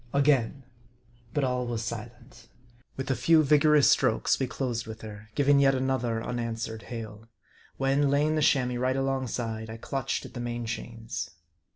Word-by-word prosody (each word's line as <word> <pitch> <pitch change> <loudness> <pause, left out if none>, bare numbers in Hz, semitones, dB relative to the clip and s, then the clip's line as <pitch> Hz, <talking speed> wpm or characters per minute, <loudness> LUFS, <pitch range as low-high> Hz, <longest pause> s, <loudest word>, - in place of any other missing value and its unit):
Again. 140 -2 +2 0.7
But 145 +3 0
all 125 -1 0
was 115 -1 -2
silent. 120 +2 -8 0.5
With 135 0 -2
a - - +2
few 155 +6 +4
vigorous 150 0 +5
strokes, - - +3
we 130 - 0
closed 120 -4 -3
with 110 0 -8
her, 110 0 -10
giving 140 0 +4
yet 135 -1 +4
another 125 -3 -1
unanswered 115 -2 -3
hail; 110 -1 -7 0.5
when, 135 +1 +2
lay 140 +1 +3
ing 155 - +1
the 155 - +1
Chamois 125 -4 +2
right 130 +1 +1
alongside, 125 -4 -2
I 110 - -6
clutched 135 +3 -3
at - - -11
the 120 - -6
main 120 0 -3
chains. 115 -2 -5
125 Hz, 165 wpm, -28 LUFS, 115-135 Hz, 0.7 s, vigorous